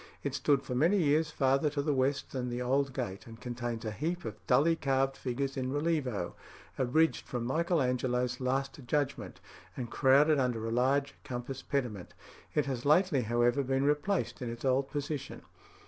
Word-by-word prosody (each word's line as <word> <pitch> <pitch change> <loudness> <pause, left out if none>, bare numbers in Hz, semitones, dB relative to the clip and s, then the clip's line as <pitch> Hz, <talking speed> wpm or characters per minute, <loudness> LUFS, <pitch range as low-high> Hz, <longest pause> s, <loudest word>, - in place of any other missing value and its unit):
It - - -2
stood 140 -2 +2
for 125 - -5
many 165 +11 +3
years 155 -2 +2
farther 135 +1 +2
to 145 0 -2
the 150 0 +1
west 135 +1 0
than 125 -2 -3
the 120 0 -3
old 135 +2 +1
gate, 120 -7 -5
and 115 -1 -11
contains 120 -2 -4
a 110 - -2
heap 165 +9 -3
of 110 - -3
dully 150 +6 +4
carved 135 -2 +1
figures 135 +1 -3
in 130 -1 -2
relievo, 145 - -1 0.4
abridged 155 +6 +1
from 120 -2 -3
Michael 165 +4 +1
Angelo's 125 0 0
"Last 135 +2 -1
Judgment," 145 +1 -1 0.4
and 120 -3 -5
crowded 145 +2 +4
under 120 -4 0
a - - -2
large 135 +4 +2
"compass 130 0 -5
pediment." 120 -10 -3 0.4
It 150 - +2
has 130 -3 -3
lately, 155 -1 +4
however, 120 +3 +2
been 135 0 0
replaced 150 +4 0
in 125 - -3
its 120 +2 -6
old 135 +1 +2
position. 145 -1 -4
135 Hz, 175 wpm, -31 LUFS, 125-145 Hz, 0.4 s, dully